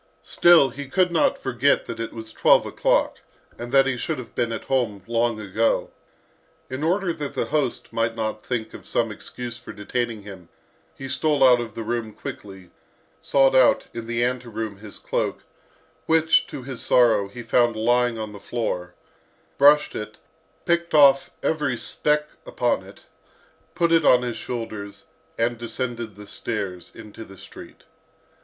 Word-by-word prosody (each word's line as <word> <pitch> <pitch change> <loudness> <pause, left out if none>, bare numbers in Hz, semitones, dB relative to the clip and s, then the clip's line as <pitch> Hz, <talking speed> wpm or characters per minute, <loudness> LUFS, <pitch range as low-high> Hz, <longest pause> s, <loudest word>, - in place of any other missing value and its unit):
Still, 170 -7 +5
he 140 +2 -7
could 180 +1 +2
not 165 - +2
forget 130 +2 +1
that 115 - -7
it 115 - -4
was 110 -1 -9
twelve - - +4
o'clock, - - +1 0.4
and 120 0 -6
that 135 0 +5
he 135 -2 -1
should 155 +5 -3
have 125 - -9
been 120 -1 -1
at 115 - -4
home 115 -8 -1
long 115 -1 0
ago. 110 +2 0 0.8
In 130 +3 -4
order 180 +2 +1
that 145 -3 -6
the - - 0
host 145 -5 -1
might 115 0 0
not 110 -1 -3
think 115 -3 -3
of - - -11
some - - 0
excuse 120 -1 -8
for - - -10
detaining 110 +1 -3
him, 95 -4 -11 0.5
he 135 - -7
stole 140 +2 +1
out 125 -1 +5
of 115 -2 -7
the 115 - -4
room 115 -1 -3
quickly, 95 -4 -9 0.5
sought 135 -1 +3
out, 130 -1 +4
in 115 -1 -6
the 120 0 0
ante 125 0 -2
room, 110 -2 -5
his 105 0 -11
cloak, - - -3 0.6
which, 160 0 +3
to 130 - -8
his 130 -1 -6
sorrow, 115 -5 +3
he 120 +5 -9
found 120 0 +2
lying 120 +1 +2
on 110 -1 -5
the 100 - -10
floor, 90 -7 -4 0.6
brushed 145 +1 +5
it, 105 0 -7 0.5
picked 170 -1 0
off 140 -2 +6
every 150 -6 0
speck 150 +5 0 0.2
upon - - -1
it, - - -16 0.7
put 170 -1 +1
it 165 -1 +4
on 125 -1 +5
his 120 -2 -3
shoulders, 110 -4 -6 0.3
and 115 0 0
descended 120 -2 -4
the 105 0 -11
stairs 100 -5 -5
to 110 0 -11
the 95 -2 -14
street. - - -13
120 Hz, 165 wpm, -23 LUFS, 110-135 Hz, 0.8 s, off